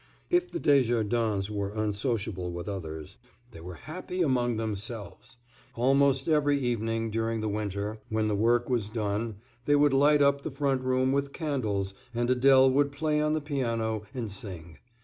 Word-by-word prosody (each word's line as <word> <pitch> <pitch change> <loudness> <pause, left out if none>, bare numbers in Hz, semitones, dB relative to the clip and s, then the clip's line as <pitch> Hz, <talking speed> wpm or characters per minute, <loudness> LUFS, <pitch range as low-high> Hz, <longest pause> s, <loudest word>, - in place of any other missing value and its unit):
If 355 0 +2
the 345 - -3
Desjardins 115 -6 +2
were 100 -1 -2
unsociable 105 -3 -2
with 85 +2 -6
others, 80 -6 -6 0.3
they 85 - -11
were 90 +1 -8
happy 180 - -4
among 120 -5 +1
themselves. 110 0 -5 0.4
Almost 135 +2 +3
every 145 -2 +3
evening 115 -3 -1
during 115 0 -1
the 110 - -2
winter, 105 0 -3
when 110 0 0
the 105 - 0
work 120 +3 +2
was 115 -5 -1
done, 110 0 -2 0.3
they 145 - +4
would 145 -1 +4
light 145 +2 +5
up 140 0 +3
the - - -4
front 135 -2 0
room 130 0 +1
with 140 0 -1
candles, 110 - -2 0.2
and 120 +1 0
Adèle 130 +1 +5
would 140 +1 +2
play 150 +1 0
on 150 0 +1
the 155 - 0
piano 115 -7 -1
and 120 -6 -5
sing. 85 -6 -8
115 Hz, 165 wpm, -28 LUFS, 105-140 Hz, 0.4 s, light